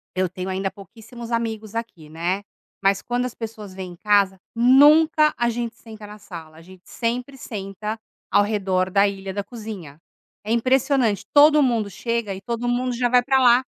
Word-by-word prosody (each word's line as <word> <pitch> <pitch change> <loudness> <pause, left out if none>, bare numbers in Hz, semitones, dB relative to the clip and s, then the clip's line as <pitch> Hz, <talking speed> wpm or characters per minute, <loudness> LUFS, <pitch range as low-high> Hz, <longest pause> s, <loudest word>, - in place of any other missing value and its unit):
eu 185 0 0
tenho 185 +1 -6
ainda 190 +1 -2
pouquíssimos 225 +4 -11
amigos 225 -2 -3
aqui, 210 -10 -6
né. 175 +5 -2 0.4
Mas 195 0 +2
quando 245 +1 -2
as 250 - -6
pessoas 215 -4 -8
vêm 185 -1 -7
em - - -13
casa, 200 0 +2 0.2
nunca 300 +5 +5
a 240 0 +1
gente 235 0 -4
senta 220 -2 -12
na 210 +1 -11
sala, 165 -6 -11
a 165 - -13
gente 185 +1 -16
sempre 250 +3 -3
senta 210 0 -6 0.3
ao 205 - +5
redor 190 -3 0
da 200 +2 +4
ilha 195 -1 -5
da 200 +1 -3
cozinha. 205 - -9 0.4
É 215 - -4
impressionante, 255 -3 +2
todo 300 +1 +7
mundo 230 -5 0
chega 230 +1 -3
e 190 - -8
todo 235 +4 -3
mundo 245 +1 0
já 245 0 +1
vai 245 0 +4
pra 270 0 +3
lá. 245 +1 +5
220 Hz, 185 wpm, -22 LUFS, 195-245 Hz, 0.4 s, todo